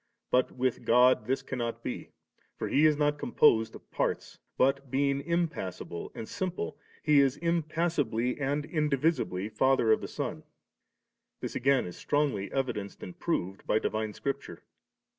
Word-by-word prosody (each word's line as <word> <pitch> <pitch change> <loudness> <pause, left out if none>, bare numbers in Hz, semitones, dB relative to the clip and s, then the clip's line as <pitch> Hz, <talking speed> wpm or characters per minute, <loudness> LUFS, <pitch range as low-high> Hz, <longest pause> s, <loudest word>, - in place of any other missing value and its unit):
But 125 0 +2
with 130 -1 -1
God 125 -2 +5
tiiis 135 +1 -1
cannot 120 -3 -3
be; - - -5 0.5
for - - -2
He 150 +3 +5
is 150 -1 +2
not 145 0 +1
composed 110 -3 +3
of - - -14
parts, - - -2 0.2
but 135 +1 +2
being 140 +1 +1
impassible 155 - -3
and 110 - -6
simple. 180 -5 -4 0.2
He 150 -2 +5
is 135 -2 +3
im 170 0 +1
passibly 145 -6 -1
and 145 +2 0
indivisibly 150 - 0
Father 130 -1 +3
of - - +4
the - - -4
Son. - - -4 1.0
This - - -5
again 135 +1 +3
is 90 - -8
strongly 140 -10 0
evidenced 120 -7 -3
and 90 - -9
proved 95 +2 -2
by - - +3
divine 110 0 -1
Scripture. 140 +5 -4
135 Hz, 150 wpm, -29 LUFS, 115-150 Hz, 1.0 s, God